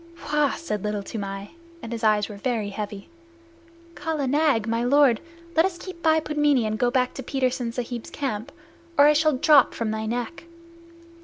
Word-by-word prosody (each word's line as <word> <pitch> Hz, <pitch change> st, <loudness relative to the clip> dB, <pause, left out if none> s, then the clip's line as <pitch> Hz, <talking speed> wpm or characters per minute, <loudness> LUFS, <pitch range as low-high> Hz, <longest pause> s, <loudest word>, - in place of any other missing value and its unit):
"Wah!" 295 Hz, -2 st, +3 dB
said 210 Hz, -, -4 dB
Little 210 Hz, -1 st, -2 dB
Toomai, 195 Hz, -1 st, -5 dB, 0.3 s
and 230 Hz, -, -6 dB
his 230 Hz, -1 st, -5 dB
eyes 210 Hz, -2 st, +3 dB
were 210 Hz, -, -8 dB
very 220 Hz, -2 st, -2 dB
heavy. 205 Hz, -1 st, -6 dB, 0.9 s
"Kala 310 Hz, -3 st, -2 dB
Nag, 275 Hz, -5 st, +2 dB
my 230 Hz, +1 st, 0 dB
lord, 265 Hz, -2 st, +4 dB, 0.3 s
let 325 Hz, -, +5 dB
us 370 Hz, -1 st, -1 dB
keep 365 Hz, -1 st, -9 dB
by 320 Hz, -1 st, +4 dB
Pudmini 295 Hz, -5 st, +1 dB
and 215 Hz, 0 st, -2 dB
go 245 Hz, -, +3 dB
to 255 Hz, +1 st, 0 dB
Petersen 255 Hz, -2 st, -1 dB
Sahib's 240 Hz, -1 st, -5 dB
camp, 260 Hz, -2 st, -4 dB, 0.5 s
or 285 Hz, -, +8 dB
I 300 Hz, -, +6 dB
shall 310 Hz, 0 st, +3 dB
drop 290 Hz, 0 st, +5 dB
from 225 Hz, -2 st, -2 dB
thy 220 Hz, 0 st, -3 dB
neck." 245 Hz, +9 st, -4 dB
245 Hz, 170 wpm, -24 LUFS, 220-295 Hz, 0.9 s, or